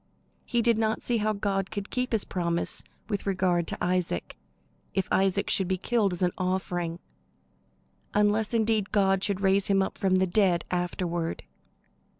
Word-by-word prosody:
He 240 -1 0
did 230 -1 +3
not 220 -1 0
see 240 - +1
how 215 0 +1
God 195 -1 -1
could 205 -1 -5
keep 250 0 -1
his 225 -3 +1
promise 170 -2 -1 0.2
with 205 -2 -3
regard 180 -3 +1
to - - -3
Isaac, 180 -1 -1 0.6
if 190 - 0
Isaac 195 +1 +2
should 190 - +2
be 190 0 0
killed 215 0 +1
as 180 +1 -3
an 180 - +3
offering; 180 -2 -1 1.2
unless 210 +1 +2
indeed 220 -3 +1
God 195 -2 +2
should 200 -1 0
raise 195 0 +3
him 195 -1 +3
up - - -5
from 190 -1 +2
the 185 0 +3
dead 185 -2 +2
afterward. 175 -1 -2
195 Hz, 160 wpm, -27 LUFS, 180-210 Hz, 1.2 s, did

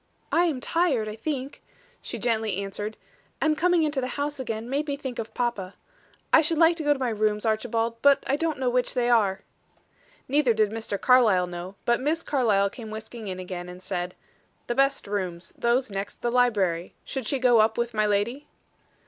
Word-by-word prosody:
"I 345 - +4
am 305 -7 -1
tired, 275 -6 +1
I 215 - -5
think," 270 +2 -4 0.4
she - - -6
gently 220 -5 0
answered; 205 +2 -4 0.4
"and 310 -1 +2
coming 355 0 +3
into 295 -3 0
the 255 - -2
house 285 0 -2
again 225 -3 -4
made 285 +4 -1
me 285 -1 -2
think 260 -3 -6
of 225 -1 -6
papa. 225 -6 -2 0.6
I 325 - +8
should 320 +1 0
like 330 +1 +5
to 320 - -3
go 295 - +3
to - - -6
my 260 -2 -1
rooms, 215 0 0
Archibald, 225 +1 -1
but 280 -1 +5
I 270 - +1
don't 320 +1 -1
know 260 -1 -1
which 245 0 +1
they 245 -1 +2
are." 205 -5 +3 0.9
Neither 270 -4 +3
did 215 -1 +2
Mr. 220 -3 -3
Carlyle 225 -8 +5
know, 175 +2 -7
but 235 +1 +2
Miss 320 +5 0
Carlyle 210 -8 +2
came 225 -2 -9
whisking 220 +1 -8
in 185 -1 -4
again, 180 -1 -6
and 180 0 -9
said: 180 0 -4 0.5
"The 240 - -1
best 275 +2 +2
rooms; 185 -4 -4
those 240 0 +1
next 195 0 -5
the 240 - +1
library. 200 -9 +1
Should 265 -5 -4
she 275 - +1
go 250 -3 +4
up 220 +1 +3
with 235 0 -1
my 215 -1 +2
lady?" 220 +8 -1
235 Hz, 200 wpm, -26 LUFS, 210-270 Hz, 0.9 s, I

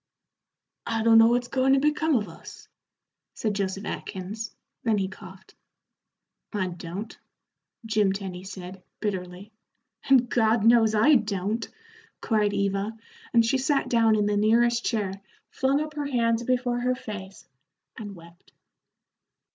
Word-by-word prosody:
"I 225 -1 -1
don't 225 0 +7
know 225 - +7
what's 245 +1 +1
goin' 265 0 +2
to 275 - +4
become 300 +1 +1
of 210 -4 0
us," 165 - -12 0.7
said 215 -2 -1
Joseph 195 0 -3
Atkins 210 +4 -5 0.3
then 225 -3 +1
he 195 -1 0
coughed. 190 0 -13 1.0
"I 190 -4 -1
don't," 175 +5 -7 0.7
Jim 215 -3 +2
Tenny 190 -2 -5
said, 190 -1 -9 0.2
bitterly. 190 0 -4 0.5
"And 255 -3 +5
God 225 -2 +2
knows 225 -2 +5
I 270 +9 +5
don't," 210 +1 -3 0.5
cried 210 -3 +1
Eva, 200 +2 -1 0.3
and 230 -1 +4
she 265 +4 +1
sat 275 +1 0
down 225 -2 +4
in 210 -1 +1
the 205 0 +1
nearest 235 +3 +3
chair, 200 -4 -2 0.3
flung 270 +1 +1
up 305 0 -4
her 295 -1 -3
hands 230 -3 +1
before 245 0 0
her 250 +1 0
face, 205 -5 -9 0.5
and 205 -3 -8
wept. 170 +1 -17
220 Hz, 140 wpm, -26 LUFS, 195-240 Hz, 1.0 s, don't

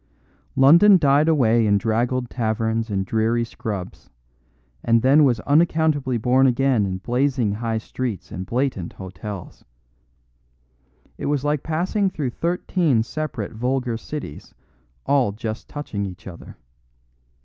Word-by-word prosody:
London 170 +9 +7
died 145 -1 +3
away 120 -8 +3
in 100 -1 +4
draggled 120 +4 -1
taverns 115 -1 -2
and 95 -2 -1
dreary 115 +3 0
scrubs, 105 -5 -7 0.7
and 115 -1 +2
then 140 +4 +5
was 125 -5 +2
unaccountably 150 -3 +2
born 125 +4 +3
again 125 -4 +2
in 95 -1 -3
blazing 125 +1 0
high 115 +2 -2
streets 110 -3 -5
and 90 +1 -6
blatant 125 -8 -2
hotels. 95 0 -9 1.6
It - - -3
was 145 -2 0
like 150 -1 0
passing 185 +5 0
through 145 -8 -3
thirteen 170 - 0
separate 140 -5 -5
vulgar 125 +1 -2
cities 115 - -8 0.5
all 130 -7 +2
just 110 0 -6
touching 105 -9 -4
each 95 +4 -11
other. 90 -3 -11
120 Hz, 125 wpm, -22 LUFS, 110-145 Hz, 1.6 s, London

